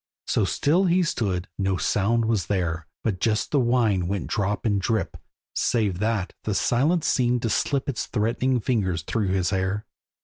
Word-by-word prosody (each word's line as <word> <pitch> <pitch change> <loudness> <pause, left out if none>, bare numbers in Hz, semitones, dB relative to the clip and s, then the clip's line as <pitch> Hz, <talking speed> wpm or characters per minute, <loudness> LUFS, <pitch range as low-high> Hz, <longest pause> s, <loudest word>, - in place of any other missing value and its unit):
So 105 - +1
still 150 - +2
he 180 +1 +3
stood, 95 - -1
no 95 -1 +1
sound 115 +5 +1
was 110 -6 0
there, 85 -6 -1 0.2
But 100 -5 -1
just 110 +1 0
the 145 - +3
wine 115 -7 +2
went 100 +1 -2
drop 100 0 -1
and 100 -3 +1
drip; 110 +3 -1 0.4
Save 105 -7 0
that, 105 -3 -1
the 105 - -1
silence 150 - +2
seemed 125 -1 +1
to 115 - 0
slip 140 -2 0
Its 135 -5 -2
threatening 125 +3 0
fingers 95 -8 0
through 110 -3 -1
his 95 -1 0
hair. 95 +2 -1
105 Hz, 170 wpm, -25 LUFS, 95-120 Hz, 0.4 s, he